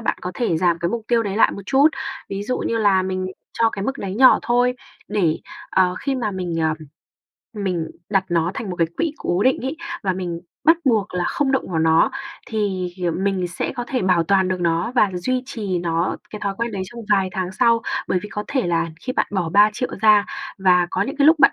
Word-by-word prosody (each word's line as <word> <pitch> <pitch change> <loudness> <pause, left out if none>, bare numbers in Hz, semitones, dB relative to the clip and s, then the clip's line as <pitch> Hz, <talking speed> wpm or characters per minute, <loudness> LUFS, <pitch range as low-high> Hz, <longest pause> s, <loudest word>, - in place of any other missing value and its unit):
bạn 225 - -1
có 180 - -3
thể 200 -8 0
giảm 170 -1 +2
cái 170 - 0
mục 230 +4 -3
tiêu 235 -1 +3
đấy 200 -2 -3
lại - - +4
một 200 - -7
chút. 280 +3 +5 0.4
Ví 195 0 -4
dụ 250 +5 -2
như 230 - -1
là 200 -3 +3
mình 185 0 -2 0.3
cho 230 -1 +4
cái 195 -2 -4
mức 270 +4 -2
đấy 190 -1 -4
nhỏ 260 +4 +7
thôi 245 +1 +2 0.3
để, 185 -7 +1 0.3
ờ, 180 -1 +3
khi 275 -1 -1
mà 235 -5 -1
mình, 180 -3 -4
ờm, 160 -1 +1 0.8
mình 185 -6 -2 0.2
đặt 195 -2 +2
nó 170 0 +1
thành 210 - -4
một 180 - -4
cái 165 - +2
quỹ 330 -3 0
cố 175 +3 0
định 260 +3 +3
ấy, 270 +4 -3 0.3
và 190 -3 +1
mình 175 -2 -4 0.2
bắt 325 +2 +6
buộc 215 -8 +1
là 180 - 0
không 275 -2 0
động 265 - -1
vào 165 - +1
nó 160 0 +4 0.4
thì 200 -5 -1
hiềm 180 +1 -2
mình 190 -3 0
sẽ 175 - -3
có 245 - -2
thể 255 - -1
bảo 180 -3 +3
toàn 190 +1 +3
được 185 -1 -2
nó 170 +5 0
và 210 -4 +4
duy 250 +9 -1
trì 205 -8 -3
nó 170 0 -1
cái 210 - -7
thói 200 -1 -2
quen 235 0 -2
đấy 195 -2 -3
trong 235 +5 -9
vài 195 -2 +3
tháng 185 0 -3
sau. 230 +2 +3 0.3
Bởi 185 - +2
vì 210 - -7
có 210 0 -5
thể 265 -6 0
là 170 -1 +1
khi 255 - -4
bạn - - +1
bỏ 185 -5 -1
3.000.000 210 +5 +3
ra 210 -2 +6 0.3
và 180 -2 +4
có - - 0
những 275 +3 -4
cái 285 0 +4
lúc 320 +1 +6
bạn 275 - +6
195 Hz, 235 wpm, -21 LUFS, 180-235 Hz, 0.8 s, nhỏ